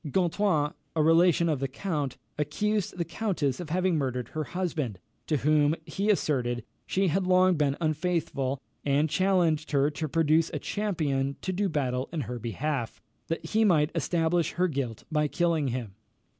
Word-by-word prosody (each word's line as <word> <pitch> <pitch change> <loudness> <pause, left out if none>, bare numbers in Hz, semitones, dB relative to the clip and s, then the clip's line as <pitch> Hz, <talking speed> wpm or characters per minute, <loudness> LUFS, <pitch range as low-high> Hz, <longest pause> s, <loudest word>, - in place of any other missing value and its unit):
Gontran, 170 -2 +1 0.2
a 155 - +3
relation 170 +1 +4
of 155 -4 0
the 135 - -1
count, 145 -2 -3 0.2
accused 185 +7 -1
the 170 - -1
countess 170 - -1
of 175 -3 -6
having 180 0 +1
murdered 125 -3 -2
her 155 -1 -3
husband, 160 - -2 0.3
to 155 - +2
whom, 150 +2 +3
he 195 +6 -2
asserted, 125 - +1 0.2
she 190 -1 +1
had 185 +3 0
long 185 0 +5
been 145 -3 +1
unfaithful, 155 -4 -1 0.2
and 145 +2 +2
challenged 175 -4 +2
her 140 +1 +3
to 150 +1 -4
produce 160 +1 +3
a - - +1
champion 145 -10 -1
to 185 - -1
do 195 +2 0
battle 130 -4 -1
in 165 -2 -2
her 120 0 -5
behalf, 120 +2 -3 0.3
that 165 0 -3
he 220 +7 +2
might 160 -7 +3
establish 165 -1 +1
her 180 +1 +2
guilt 135 - -3
by 150 -1 +2
killing 165 -2 +1
him. 120 -5 -3
155 Hz, 165 wpm, -28 LUFS, 140-180 Hz, 0.3 s, long